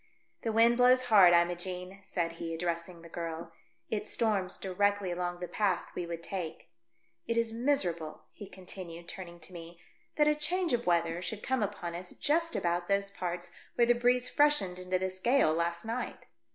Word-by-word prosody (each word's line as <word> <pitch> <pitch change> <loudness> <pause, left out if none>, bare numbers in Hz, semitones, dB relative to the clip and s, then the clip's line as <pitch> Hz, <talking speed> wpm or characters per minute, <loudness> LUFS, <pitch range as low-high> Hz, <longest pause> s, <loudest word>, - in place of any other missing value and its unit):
"The 225 - -1
wind 230 +2 +5
blows 250 +1 +5
hard, 195 -5 +8
Imogene," 180 +2 0
said 170 -3 -2
he, 165 0 -5
addressing 170 0 -3
the - - -10
girl. 165 0 -5 0.2
" 115 0 -43
It 210 -1 -1
storms 205 -5 0
directly 200 0 0
along 175 0 -3
the 180 - -3
path 195 -3 0
we 175 - -4
would 170 -1 -5
take. 180 -4 -5 0.6
It 230 - 0
is 230 -1 +1
miser 235 - +1
able," 160 -2 -9
he 205 - -10
continued, 180 -2 -9
turning 175 -2 -8
to 160 +4 -7
me, 170 0 -10 0.2
" - - -39
that 300 -1 +4
a 300 - +5
change 330 +2 0
of 240 -4 0
weather 170 0 +2
should 200 +4 -5
come 260 -2 0
upon 195 -4 -3
us 180 +1 -6
just 330 +3 +1
about 175 0 0
those 200 0 +1
parts 180 -2 -4 0.2
where 235 - +5
the 240 - +5
breeze 245 +1 +2
freshened 290 -13 +2
into 185 0 0
this 185 0 -3
gale 240 - +4
last 170 +3 -1
night. 235 +2 -4
185 Hz, 190 wpm, -31 LUFS, 170-230 Hz, 0.6 s, hard